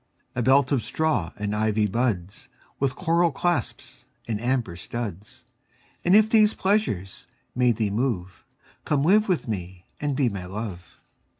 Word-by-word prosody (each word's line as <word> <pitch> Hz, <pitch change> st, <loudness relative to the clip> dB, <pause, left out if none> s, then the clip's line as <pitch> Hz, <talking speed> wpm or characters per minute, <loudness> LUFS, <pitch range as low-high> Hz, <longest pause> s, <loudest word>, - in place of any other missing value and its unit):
A 125 Hz, -, -1 dB
belt 130 Hz, +2 st, +4 dB
of 135 Hz, -4 st, +2 dB
straw 150 Hz, -, 0 dB
and 105 Hz, 0 st, -2 dB
ivy 110 Hz, 0 st, +1 dB
buds 105 Hz, -4 st, -2 dB, 0.3 s
With 135 Hz, -2 st, 0 dB
coral 170 Hz, -1 st, +2 dB
clasps 175 Hz, +5 st, -2 dB, 0.2 s
and 110 Hz, -2 st, -2 dB
amber 120 Hz, -7 st, -1 dB
studs: 115 Hz, +5 st, -6 dB, 0.6 s
And 180 Hz, +3 st, +5 dB
if 215 Hz, 0 st, +6 dB
these 215 Hz, -1 st, +5 dB
pleasures 190 Hz, -, -1 dB, 0.3 s
may 125 Hz, 0 st, +3 dB
thee 110 Hz, -3 st, -1 dB
move, 100 Hz, -6 st, -2 dB, 0.4 s
Come 145 Hz, -2 st, +1 dB
live 210 Hz, +6 st, +4 dB
with 180 Hz, -8 st, 0 dB
me 90 Hz, -4 st, -5 dB
and 145 Hz, -2 st, -1 dB
be 135 Hz, -2 st, +2 dB
my 100 Hz, -5 st, -4 dB
Love. 95 Hz, -2 st, -7 dB
120 Hz, 145 wpm, -25 LUFS, 100-150 Hz, 0.6 s, if